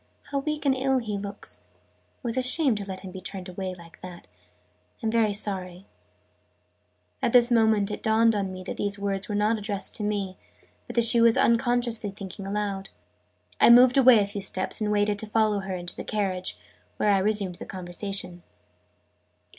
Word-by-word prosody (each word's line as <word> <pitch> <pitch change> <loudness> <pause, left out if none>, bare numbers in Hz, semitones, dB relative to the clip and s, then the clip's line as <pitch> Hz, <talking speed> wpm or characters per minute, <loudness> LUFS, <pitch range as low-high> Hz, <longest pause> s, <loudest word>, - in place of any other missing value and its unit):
"How 280 - 0
weak 300 +1 -3
and 270 -1 +3
ill 265 0 +1
he 220 -4 -3
looks! 200 +1 -7 0.5
It - - -41
was 235 -2 -1
a 260 - +1
shame 260 +1 +4
to 205 -2 -4
let 190 -1 -7
him 190 - -9
be 190 0 -9
turned 190 0 -6
away 185 0 -5
like 170 -1 -16
that. 180 -1 -10 0.8
I'm 220 - 0
very 225 -2 +2
sorry 190 -3 -1 0.7
" - - -45
At - - 0
this 245 0 +5
moment 220 -3 +3
it - - -5
dawned 225 +1 +3
on 200 -2 -2
me 185 0 -8
that - - -6
these 205 0 -2
words 200 0 -3
were 210 - -2
not 215 +2 +1
addressed 205 -1 -3
to 215 - -5
me, 200 -3 -2 0.5
but - - -8
that 235 - +4
she 230 +1 +5
was 230 -1 +5
unconsciously 235 -2 +2
thinking 195 0 -8
aloud. 200 -1 -3 0.7
I - - +6
moved 245 +1 +7
away 255 -3 +7
a 205 - +3
few 200 0 -6
steps, 190 +2 -3
and 210 -1 0
waited 205 0 +1
to 220 - -4
follow 215 -1 +1
her 190 -1 -4
into 175 -1 -5
the - - -6
carriage, 190 -4 -2 0.4
where 210 - +2
I 195 - +3
resumed 200 -3 -1
the - - -5
conversation. 180 0 -5
205 Hz, 195 wpm, -26 LUFS, 195-230 Hz, 0.8 s, moved